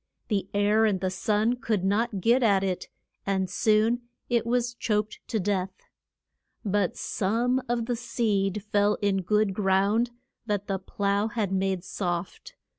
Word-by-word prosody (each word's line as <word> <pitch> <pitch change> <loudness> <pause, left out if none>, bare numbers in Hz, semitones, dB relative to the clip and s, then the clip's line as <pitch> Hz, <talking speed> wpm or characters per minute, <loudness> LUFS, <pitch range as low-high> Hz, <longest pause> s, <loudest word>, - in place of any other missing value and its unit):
The 200 -3 -1
air 205 +2 +3
and 200 -4 +1
the 185 0 -1
sun 215 +5 +1
could 220 -5 -1
not 205 +1 0
get 240 +6 +4
at 200 -5 +3
it, 185 -2 -2 0.4
and 190 -1 0
soon 220 +5 +2 0.3
it 235 -1 +1
was 240 0 +1
choked 215 -2 -1
to 220 - -1
death. 190 -1 -1 0.9
But 200 -2 0
some 235 +6 0
of 235 -1 0
the 245 0 -1
seed 210 -4 -1
fell 205 0 +2
in 195 -1 +2
good 210 +2 +1
ground, 200 +4 +2 0.4
that 205 -2 -1
the 195 -1 -2
plough 200 +2 0
had 215 -3 -2
made 190 -2 0
soft. 180 - -4
205 Hz, 150 wpm, -27 LUFS, 195-225 Hz, 0.9 s, get